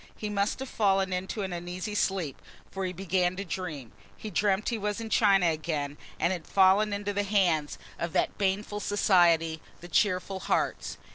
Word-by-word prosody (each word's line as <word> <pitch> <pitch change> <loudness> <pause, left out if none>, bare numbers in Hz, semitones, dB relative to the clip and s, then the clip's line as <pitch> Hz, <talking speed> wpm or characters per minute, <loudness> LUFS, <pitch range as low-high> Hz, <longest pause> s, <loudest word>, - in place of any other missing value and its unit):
He 210 - -4
must 200 0 0
have 265 - -5
fallen 195 -5 +1
into 190 +3 -3
an 190 -2 -4
uneasy 180 +4 -5
sleep 190 -8 -1 0.3
for 195 -1 -3
he 185 - -2
began 185 0 0
to 200 +2 -5
dream. 155 - -5 0.3
He 215 - -7
dreamt 200 +2 +1
he 235 - -1
was 210 +1 -2
in 225 -1 -6
China 195 -4 +4
again 155 -3 -1 0.2
and 185 - +2
had 175 -4 -6
fallen 195 +2 +4
into 205 0 -2
the 205 - +1
hands 185 -7 +1 0.2
of 170 - -2
that - - +1
baneful 205 +1 -1
society, 170 -6 +3 0.2
the 175 - -10
"Cheerful 185 +1 +1
Hearts." - - -1
190 Hz, 180 wpm, -28 LUFS, 175-205 Hz, 0.3 s, China